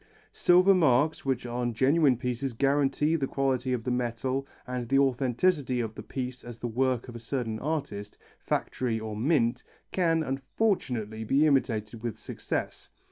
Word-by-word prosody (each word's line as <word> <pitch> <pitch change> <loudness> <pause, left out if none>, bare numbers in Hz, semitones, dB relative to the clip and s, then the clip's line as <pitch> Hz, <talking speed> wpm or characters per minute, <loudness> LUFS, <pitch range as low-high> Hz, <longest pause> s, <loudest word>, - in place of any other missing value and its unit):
Silver 180 +2 +5
marks, 155 -4 +3
which 130 -2 -1
on 120 -1 -2
genuine 135 +2 +4
pieces 125 +1 -3
guarantee 140 +4 +2
the 140 -4 0
quality 135 -2 0
of 125 -3 -1
the 125 - -1
metal 125 +2 -1 0.2
and 125 -2 -4
the 135 - +4
authenticity 135 +1 +2
of 110 -2 -2
the - - -8
piece 125 -1 -5
as 120 -1 -9
the 120 - -4
work 125 +1 0
of 120 - -9
a - - -6
certain 115 -2 -3
artist, 120 -9 -4 0.2
factory 120 -3 -1
or 110 -1 -5
mint, 120 -1 +1 0.3
can, 165 -3 +2
unfortunately, 130 - -1
be 135 +7 +3
imitated 115 -6 +1
with 115 -2 -4
success. - - -5
130 Hz, 155 wpm, -28 LUFS, 120-140 Hz, 0.3 s, Silver